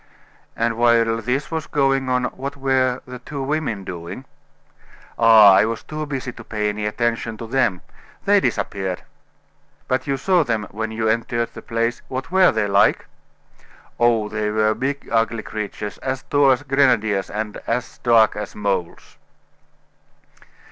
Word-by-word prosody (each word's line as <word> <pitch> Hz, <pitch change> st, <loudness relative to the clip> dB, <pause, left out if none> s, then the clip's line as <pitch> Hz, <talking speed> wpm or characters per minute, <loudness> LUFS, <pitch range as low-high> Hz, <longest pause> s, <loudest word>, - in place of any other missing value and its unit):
"And 115 Hz, 0 st, -1 dB
while 120 Hz, -1 st, +4 dB
all 115 Hz, 0 st, -1 dB
this 130 Hz, +6 st, -2 dB
was 160 Hz, -1 st, -3 dB
going 135 Hz, -2 st, +1 dB
on 125 Hz, 0 st, +1 dB
what 140 Hz, +3 st, -5 dB
were 130 Hz, -2 st, +1 dB
the 125 Hz, 0 st, -9 dB
two 140 Hz, +2 st, -6 dB
women 135 Hz, -8 st, -2 dB
doing?" 90 Hz, +8 st, -7 dB, 0.9 s
"Ah! 110 Hz, -3 st, +8 dB
I 95 Hz, -, +5 dB
was 115 Hz, 0 st, -4 dB
too 155 Hz, 0 st, -5 dB
busy 135 Hz, -3 st, -4 dB
to 115 Hz, -, -11 dB
pay 105 Hz, -1 st, -2 dB
any 105 Hz, 0 st, -3 dB
attention 115 Hz, 0 st, -2 dB
to 115 Hz, -, -7 dB
them. 115 Hz, -6 st, 0 dB, 0.4 s
They -, -, +5 dB
disappeared!" 95 Hz, -2 st, -2 dB, 0.8 s
"But 130 Hz, +3 st, -1 dB
you 135 Hz, -1 st, 0 dB
saw 180 Hz, +4 st, +2 dB
them 115 Hz, -6 st, -1 dB
when 110 Hz, +2 st, -3 dB
you 110 Hz, 0 st, -2 dB
entered 115 Hz, +1 st, -1 dB
the -, -, -9 dB
place 115 Hz, 0 st, -2 dB
what 130 Hz, +3 st, -5 dB
were 190 Hz, 0 st, +5 dB
they 110 Hz, -2 st, 0 dB
like?" 100 Hz, +1 st, +3 dB, 0.9 s
"Oh! 115 Hz, -3 st, +3 dB
they 105 Hz, 0 st, -2 dB
were 110 Hz, 0 st, +2 dB
big, 135 Hz, +5 st, -3 dB
ugly 115 Hz, -1 st, +1 dB
creatures, 105 Hz, -1 st, -6 dB
as 130 Hz, 0 st, -3 dB
tall 145 Hz, -1 st, +3 dB
as 130 Hz, +1 st, +2 dB
grenadiers, 120 Hz, -8 st, +2 dB
and 105 Hz, 0 st, -4 dB
as 125 Hz, +2 st, -3 dB
dark 115 Hz, -3 st, +4 dB
as 105 Hz, 0 st, -6 dB
moles!" 100 Hz, -4 st, -3 dB
115 Hz, 155 wpm, -21 LUFS, 110-130 Hz, 0.9 s, Ah